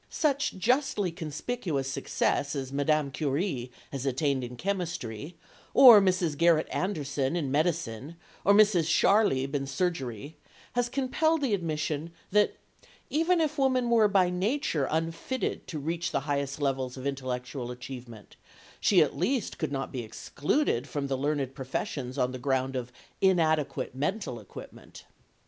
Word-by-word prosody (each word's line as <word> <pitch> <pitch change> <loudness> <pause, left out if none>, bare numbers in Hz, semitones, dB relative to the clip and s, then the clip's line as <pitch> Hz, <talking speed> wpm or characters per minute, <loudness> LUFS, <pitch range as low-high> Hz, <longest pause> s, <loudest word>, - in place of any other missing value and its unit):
Such 290 -2 0
justly 245 - +1
conspicuous 160 - -3
success 140 +1 -1
as 135 -1 -4
Madame 145 0 +1
Curie 140 -3 -2 0.2
has 135 -2 -4
attained 135 0 0
in 125 0 -6
chemistry, 170 - -4 0.4
or 240 -6 +10
Mrs. 180 -5 +1
Garrett 165 0 +3
Anderson 145 -6 -1
in 145 -6 -1
medicine, 150 -3 -1 0.3
or 200 - +5
Mrs. 205 -6 +5
Scharlieb 165 -7 +3
in 135 -1 -1
surgery, 140 - -3 0.4
has 245 0 0
compelled 300 +5 +1
the 250 -6 +1
admission 155 -3 -2 0.2
that 210 +1 +3 0.6
even 330 +3 +2
if 310 -2 0
woman 255 -3 +2
were 225 -2 +5
by 190 -3 +3
nature 185 - 0
unfitted 165 +11 -2
to 160 - -5
reach 165 +4 -2
the 140 - 0
highest 140 0 -2
levels 135 -2 -1
of 130 - -7
intellectual 130 -2 -4
achievement, 125 -3 -9 0.4
she 180 -5 +5
at 150 - -3
least 235 +5 -1
could 155 -3 -2
not 135 -1 -3
be 130 - -3
excluded 135 - -1
from 145 -2 -2
the 135 - +1
learned 140 -1 -1
professions 135 -1 -4
on 125 -1 +1
the 130 - -6
ground 130 0 0
of 125 -1 -4 0.3
inadequate 155 -8 +2
mental 145 - -2
equipment. 105 - -12
150 Hz, 140 wpm, -28 LUFS, 135-195 Hz, 0.6 s, or